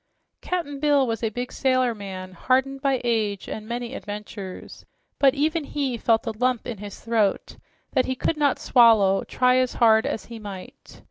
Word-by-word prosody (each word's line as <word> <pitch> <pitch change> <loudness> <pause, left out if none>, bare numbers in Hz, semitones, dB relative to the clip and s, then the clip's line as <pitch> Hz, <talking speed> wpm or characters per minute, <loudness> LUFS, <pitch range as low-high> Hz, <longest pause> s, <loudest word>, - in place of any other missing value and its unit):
Cap'n 310 -6 -3
Bill 290 -2 +3
was 225 -2 -3
a 225 - 0
big 245 +3 -5
sailor 255 -2 +1
man 190 -3 -8
hardened 265 +7 0
by 275 -3 +1
age 215 -4 -1
and 215 0 -6
many 240 +1 -4
adventures, 205 -4 -8 0.4
but 275 -1 +5
even 310 +3 0
he 280 -3 -2
felt 225 0 +1
a 225 - -1
"Lump 250 +2 -1
in 225 -5 -6
his 205 -1 -8
throat" 220 -4 0 0.3
that 255 - +1
he 260 - -1
could 320 - -1
not 290 -3 +2
swallow, 215 -5 +4
try 250 0 +2
as 255 -1 +1
hard 220 -2 +4
as - - -3
he 230 -1 -9
might. 200 -3 -10
240 Hz, 180 wpm, -24 LUFS, 215-265 Hz, 0.4 s, but